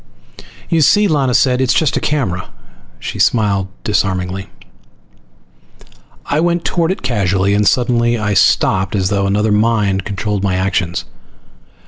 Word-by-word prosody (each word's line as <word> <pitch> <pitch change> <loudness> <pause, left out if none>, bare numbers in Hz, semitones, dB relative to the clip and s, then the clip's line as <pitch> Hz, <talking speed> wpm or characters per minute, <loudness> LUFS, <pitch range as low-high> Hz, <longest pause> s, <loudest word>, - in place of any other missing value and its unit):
"You 165 -2 +1
see?" 205 +7 +4
Lana 140 -7 +1
said. 130 -1 +2
"It's 130 0 +1
just 155 - +1
a - - +1
camera." 105 -13 -2 0.5
She - - -7
smiled 100 -5 +1 0.2
disarmingly. 95 -3 -2 1.8
I 145 - -1
went 170 +1 0
toward 170 -2 0
it 190 - -3
casually, 100 -5 0
and 105 0 +2
suddenly 120 0 +1
I 105 -2 -1
stopped 95 0 +2
as 95 -2 0
though 100 -1 0
another 105 +2 +1
mind 105 -3 +1
controlled 100 0 -3
my 95 -2 0
actions. 95 -2 -1
105 Hz, 135 wpm, -16 LUFS, 95-130 Hz, 1.8 s, see